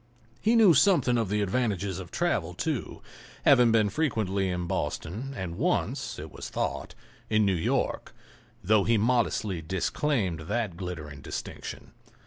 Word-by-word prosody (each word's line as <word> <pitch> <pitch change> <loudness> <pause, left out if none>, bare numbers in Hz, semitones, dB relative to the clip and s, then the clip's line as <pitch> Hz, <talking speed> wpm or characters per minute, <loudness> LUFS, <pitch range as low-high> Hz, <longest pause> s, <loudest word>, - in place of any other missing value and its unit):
He 225 +2 +3
knew 215 -7 +7
something 155 -5 +4
of 115 -5 0
the 105 0 +1
advantages 100 -3 -1
of 90 -3 -8
travel, - - -1
too, - - -3 0.4
having 125 -4 +6
been 110 -3 +3
frequently 100 -9 0
in 90 -1 -2
Boston, 105 +9 -3
and 90 -3 -5
once, - - -1
it - - -8
was - - -7
thought, - - -3 0.3
in 110 -1 +3
New 100 - +3
York, 85 - -1 0.5
though 105 +2 +4
he 115 +2 +3
modestly 110 -5 +1
disclaimed 95 - -1
that 110 -7 -1
glittering 80 -6 -6
distinction. - - -7
105 Hz, 140 wpm, -28 LUFS, 90-120 Hz, 0.5 s, knew